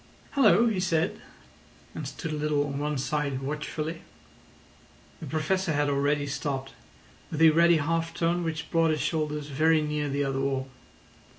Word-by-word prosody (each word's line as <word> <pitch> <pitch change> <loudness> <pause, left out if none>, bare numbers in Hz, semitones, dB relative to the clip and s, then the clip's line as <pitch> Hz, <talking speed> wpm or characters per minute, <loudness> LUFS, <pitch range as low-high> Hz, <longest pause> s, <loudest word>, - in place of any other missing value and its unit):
"Hallo!" 260 -4 +5
he 220 -5 +1
said, 170 -1 0 0.7
and - - -5
stood 160 - -5
a - - -2
little 150 -1 0
on 140 -1 -4
one 150 0 -1
side 140 0 -2
watchfully. 150 +3 -4 1.2
The - - -7
Professor 165 +2 0
had 145 0 +1
already 145 +1 +1
stopped, 135 -1 -3 0.6
with 155 - -4
a 160 -1 +7
ready 170 +1 +5
half 165 +2 -1
turn 175 +1 0
which 160 -2 -4
brought 165 -1 +3
his 155 -1 0
shoulders 150 -2 -2
very 155 +3 +3
near 150 -1 -2
the 140 +1 0
other 135 -1 -1
wall. 135 -1 -1
150 Hz, 160 wpm, -27 LUFS, 145-165 Hz, 1.2 s, a